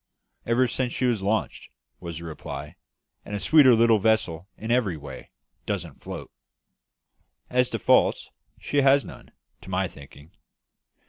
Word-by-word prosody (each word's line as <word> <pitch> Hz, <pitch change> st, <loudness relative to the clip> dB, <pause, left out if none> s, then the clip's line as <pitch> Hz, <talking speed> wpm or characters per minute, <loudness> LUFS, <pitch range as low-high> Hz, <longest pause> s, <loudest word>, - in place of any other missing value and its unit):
"Ever 120 Hz, +2 st, +3 dB
since 125 Hz, +1 st, -2 dB
she 130 Hz, -, -1 dB
was 120 Hz, -5 st, +1 dB
launched," 105 Hz, +3 st, -2 dB, 0.3 s
was 85 Hz, -3 st, -7 dB
the 85 Hz, -, -8 dB
reply, 75 Hz, -2 st, -7 dB, 0.5 s
"and 105 Hz, -, -6 dB
a -, -, -2 dB
sweeter 135 Hz, -1 st, +6 dB
little 115 Hz, -1 st, +4 dB
vessel, 100 Hz, -5 st, 0 dB
in 110 Hz, +2 st, -4 dB
every 110 Hz, -9 st, +1 dB
way, 70 Hz, -3 st, -10 dB, 0.4 s
doesn't -, -, -4 dB
float. -, -, -8 dB, 1.2 s
As 125 Hz, 0 st, +2 dB
to -, -, -2 dB
faults, -, -, +2 dB, 0.3 s
she 145 Hz, -, -3 dB
has 140 Hz, 0 st, +4 dB
none, -, -, -12 dB, 0.3 s
to 95 Hz, -, -12 dB
my 95 Hz, 0 st, 0 dB
thinking. 70 Hz, +1 st, -15 dB
110 Hz, 145 wpm, -25 LUFS, 85-125 Hz, 1.2 s, sweeter